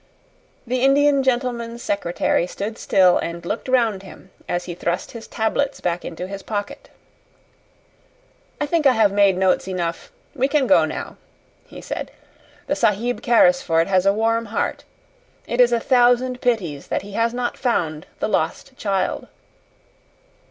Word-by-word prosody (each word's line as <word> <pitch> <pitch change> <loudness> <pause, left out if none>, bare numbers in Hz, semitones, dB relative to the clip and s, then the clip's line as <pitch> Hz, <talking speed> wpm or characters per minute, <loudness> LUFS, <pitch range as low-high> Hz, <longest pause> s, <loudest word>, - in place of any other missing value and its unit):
The 250 +1 -1
Indian 280 +1 +4
gentleman's 240 -2 -2
secretary 175 -3 0
stood 215 +4 -5
still 185 -2 +4
and 170 0 -5
looked 210 +8 -4
round 230 -6 +2
him 190 -1 -14 0.2
as 175 0 -2
he 175 - -5
thrust 175 0 -3
his 230 -1 -9
tablets 270 +5 -1
back 175 -1 -2
into 175 +2 -6
his 195 +1 -7
pocket. 205 -1 -5 1.7
"I 295 - 0
think 305 -1 +2
I 265 - +5
have 220 -4 +3
made 200 -2 +3
notes 190 0 +1
enough; 175 - -4 0.2
we 265 -2 +1
can 280 -1 +2
go 285 - +5
now," - - -6 0.5
he - - -11
said. - - -5 0.6
"The 290 - -1
Sahib 230 0 0
Carrisford 245 - +3
has 190 0 +2
a - - +6
warm 225 +2 0
heart. 205 - -3 0.6
It 240 +1 +1
is 245 -1 +5
a 235 - +2
thousand 250 +1 +2
pities 180 - -1
that - - -2
he 205 - -10
has 230 +3 0
not 245 0 -2
found 160 - -1
the - - 0
lost 215 +8 -2
child." 195 -3 -1
225 Hz, 150 wpm, -21 LUFS, 185-250 Hz, 1.7 s, a